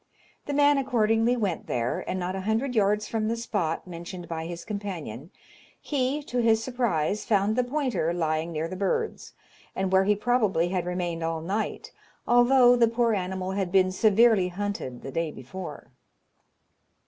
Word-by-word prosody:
The 290 - -2
man 290 0 +4
accordingly 235 -2 +2
went 200 -7 -2
there, 120 0 -1
and 185 - -2
not 180 +1 -3
a 190 - -3
hundred 225 +6 -1
yards 210 -1 +2
from 220 -1 -1
the 230 +1 -1
spot 205 -9 -2
mentioned 175 0 -8
by 160 -1 -4
his 175 0 -7
companion, 180 - -6 0.5
he, 280 +1 -1
to 250 -3 -3
his 225 -1 +3
surprise, 210 -7 -1
found 205 0 +1
the 250 - +2
pointer 245 - -1
lying 160 -1 -1
near 160 0 -2
the 185 - -6
birds, 200 - -2 0.4
and 190 -1 -1
where 190 0 +4
he 210 +1 +3
probably 210 -6 +1
had 180 -2 -2
remained 175 -2 -2
all 165 0 -1
night, 195 +7 -3 0.4
although 245 +1 +6
the 235 -1 +4
poor 230 0 +1
animal 190 -1 -2
had 190 -2 -2
been 185 -1 +4
severely 215 0 +4
hunted 180 -9 -5
the 135 - -6
day 165 +3 -1
before." 150 +4 -9
200 Hz, 165 wpm, -26 LUFS, 175-235 Hz, 0.5 s, although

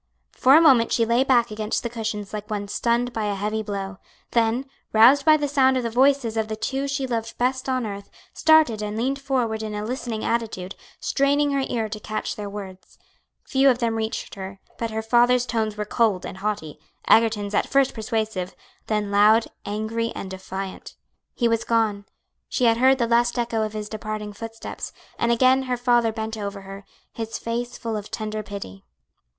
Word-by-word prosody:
For 265 +2 +5
a 320 - +8
moment 255 -8 +5
she 230 - +3
lay 235 +3 +3
back 240 -4 +3
against 215 0 -2
the - - -1
cushions 220 -3 -4
like 210 0 -5
one 205 -1 -3
stunned 235 +3 0
by 220 -1 -2
a 205 -1 -1
heavy 210 +2 -2
blow; 195 -2 -5 0.3
then, 235 +3 +1 0.3
roused 250 +6 +6
by 310 -1 +7
the 290 -1 -1
sound 265 -2 +3
of 255 - -1
the 230 - -2
voices 260 -2 +3
of 220 -1 0
the 215 - -3
two 270 +5 -2
she 275 -1 -1
loved 230 -2 -3
best 260 +2 0
on 255 -2 0
earth, 200 -1 -7 0.2
started 315 -9 +4
and 210 0 -3
leaned 270 +4 -1
forward 245 -5 -1
in 215 -1 -4
a 210 0 -3
listening 235 -2 -4
attitude, 215 -5 -2 0.3
straining 285 +1 +2
her 275 -1 +1
ear 225 -2 -1
to 215 0 -6
catch 215 +1 -4
their 205 -1 -5
words. 195 -2 -9 0.5
Few 270 0 +3
of 250 - +3
them 235 -2 0
reached 220 0 -3
her, 190 0 -8 0.2
but 230 - -2
her 220 0 -3
father's 240 +2 +4
tones 220 -3 -2
were 210 - -2
cold 210 -4 +1
and 190 - -7
haughty, 195 -8 -3 0.3
Egerton's 215 -2 +3
at - - +1
first 275 -1 +3
persuasive, 215 -4 -3 0.3
then 210 -2 -1
loud, 215 +3 +5 0.2
angry, 220 +2 -2
and 190 - -6
defiant. 190 0 -7 0.4
He 240 - +2
was 230 -1 +1
gone, 215 -3 0 0.4
she 255 - -1
had 230 -1 +4
heard 260 +2 +5
the 240 - +1
last 240 +1 +2
echo 235 -2 0
of 215 0 -2
his 210 -1 -4
departing 215 -1 -5
footsteps, 225 +2 -7 0.3
and 235 - +2
again 255 +3 +4
her 250 - 0
father 240 -2 +3
bent 220 0 -4
over 200 -1 -5
her, 195 0 -10 0.3
his 225 -1 -4
face 240 +1 -4
full 230 -2 -4
of 210 -1 -5
tender 215 -1 -4
pity. 195 - -8
225 Hz, 195 wpm, -24 LUFS, 210-245 Hz, 0.5 s, a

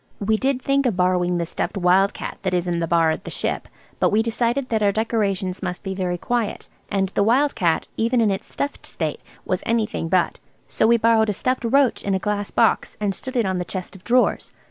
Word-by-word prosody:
We 215 +2 +1
did 265 +2 0
think 275 -1 +2
of 215 -7 -1
borrowing 180 -1 +2
the 170 - -1
stuffed 175 - -3
wild 190 +2 +3
cat - - -6
that 185 -1 0
is 175 0 -1
in 170 -1 0
the 165 - -1
bar 165 -1 +3
at - - -4
the - - -7
"Ship," - - -3 0.3
but - - +3
we 215 +2 +2
decided 240 +3 -1
that 220 -2 0
our 205 -1 +4
decorations 200 -4 -1
must 180 0 -4
be 195 - -3
very 180 -2 -2
quiet–and 205 -3 -2
the 195 - 0
wild 260 +8 +3
cat, 175 -8 0
even 235 +2 +2
in 220 -3 +3
its 195 +2 -5
stuffed 285 0 -4
state, - - -4 0.2
was - - -1
anything 220 -7 -1
but; 180 -1 +1 0.3
so 220 - +1
we 235 +1 +5
borrowed 225 -1 +3
a - - +1
stuffed 255 +4 -1
roach 270 +2 +2
in 195 -1 0
a - - +2
glass 205 +1 -2
box 230 - +1
and 205 -2 0
stood 260 +6 -8
it 235 -3 +2
on 190 -1 -1
the - - -1
chest 185 +1 -6
of 185 - -14
drawers. 250 +1 +1
205 Hz, 230 wpm, -22 LUFS, 185-235 Hz, 0.3 s, we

